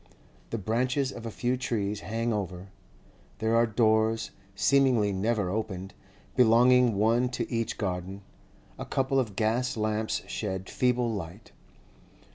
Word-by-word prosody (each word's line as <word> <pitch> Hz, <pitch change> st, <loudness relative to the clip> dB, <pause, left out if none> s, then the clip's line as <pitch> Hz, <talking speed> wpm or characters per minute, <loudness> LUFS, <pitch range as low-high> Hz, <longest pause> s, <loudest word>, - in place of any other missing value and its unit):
The 115 Hz, -, -2 dB
branches 130 Hz, +6 st, 0 dB
of 115 Hz, -2 st, -7 dB
a -, -, -3 dB
few 120 Hz, +3 st, -1 dB
trees 105 Hz, -5 st, -2 dB
hang 115 Hz, +2 st, -2 dB
over; 95 Hz, -2 st, -4 dB, 0.7 s
there 110 Hz, +2 st, +1 dB
are 115 Hz, 0 st, +4 dB
doors, 110 Hz, 0 st, +2 dB, 0.2 s
seemingly 125 Hz, -6 st, +3 dB
never 100 Hz, -1 st, 0 dB
opened, 95 Hz, -3 st, -4 dB, 0.4 s
belonging 125 Hz, 0 st, +5 dB
one 115 Hz, +5 st, +2 dB
to 125 Hz, -, -3 dB
each 115 Hz, -1 st, -1 dB
garden; 95 Hz, 0 st, -4 dB, 0.6 s
a -, -, -4 dB
couple 135 Hz, 0 st, 0 dB
of 110 Hz, -7 st, -2 dB
gas 115 Hz, +4 st, 0 dB
lamps 110 Hz, 0 st, -1 dB
shed 95 Hz, -3 st, -4 dB
feeble 125 Hz, -2 st, +1 dB
light. 95 Hz, +2 st, -7 dB
110 Hz, 130 wpm, -28 LUFS, 100-120 Hz, 0.7 s, belonging